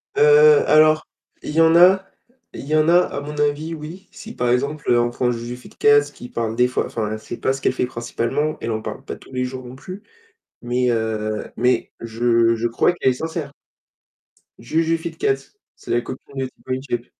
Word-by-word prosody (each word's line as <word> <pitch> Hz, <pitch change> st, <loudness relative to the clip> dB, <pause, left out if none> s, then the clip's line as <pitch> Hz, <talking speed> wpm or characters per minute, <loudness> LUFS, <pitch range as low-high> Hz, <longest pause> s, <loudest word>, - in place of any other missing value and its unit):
Heu, 435 Hz, -, +4 dB, 0.4 s
alors, 155 Hz, 0 st, +4 dB, 0.3 s
il -, -, -6 dB
y 160 Hz, -, +3 dB
en 165 Hz, 0 st, +5 dB
a 185 Hz, +2 st, +6 dB, 0.5 s
il -, -, -7 dB
y 155 Hz, -, +1 dB
en 155 Hz, 0 st, +3 dB
a 175 Hz, +1 st, +6 dB
à 180 Hz, -, -2 dB
mon 150 Hz, +1 st, -7 dB
avis, 150 Hz, +3 st, 0 dB
oui, 165 Hz, +5 st, -9 dB
si 225 Hz, -, -11 dB
par 125 Hz, 0 st, 0 dB
exemple, 140 Hz, +4 st, 0 dB
heu, 120 Hz, -, +4 dB
on 120 Hz, 0 st, +1 dB
prend 125 Hz, +1 st, -1 dB
Juju 120 Hz, +1 st, -5 dB
Fitcats 145 Hz, +3 st, +3 dB
qui 120 Hz, -, -11 dB
parle 115 Hz, -1 st, -3 dB
des 125 Hz, +1 st, +3 dB
fois, 125 Hz, -, -1 dB
enfin 110 Hz, -1 st, -3 dB
c'est 110 Hz, -, -8 dB
pas 130 Hz, -, 0 dB
ce 135 Hz, -, -4 dB
qu'elle 130 Hz, -, +1 dB
fait 125 Hz, -, -1 dB
principalement, 125 Hz, +5 st, -2 dB
elle 115 Hz, -, -3 dB
en 110 Hz, -, -1 dB
parle -, -, -7 dB
pas -, -, -6 dB
tous -, -, -17 dB
les 125 Hz, 0 st, -1 dB
jours 130 Hz, 0 st, -6 dB
non 125 Hz, -, -10 dB
plus 185 Hz, +9 st, -10 dB, 0.6 s
mais, 125 Hz, +1 st, 0 dB
heu, 110 Hz, -2 st, -2 dB
mais 125 Hz, 0 st, +1 dB
je 115 Hz, 0 st, +2 dB
je 115 Hz, +1 st, -1 dB
crois 120 Hz, +9 st, +2 dB
qu'elle 130 Hz, -, +1 dB
est -, -, -1 dB
sincère. 160 Hz, +1 st, -5 dB, 1.1 s
Juju 160 Hz, +7 st, 0 dB
Fitcats, 405 Hz, -, -3 dB, 0.2 s
c'est -, -, -9 dB
la 120 Hz, 0 st, +2 dB
copine 130 Hz, +3 st, -10 dB
de 130 Hz, -, -1 dB
Tibo 130 Hz, 0 st, -12 dB
InShape. 120 Hz, -3 st, -4 dB
130 Hz, 205 wpm, -21 LUFS, 120-155 Hz, 1.1 s, a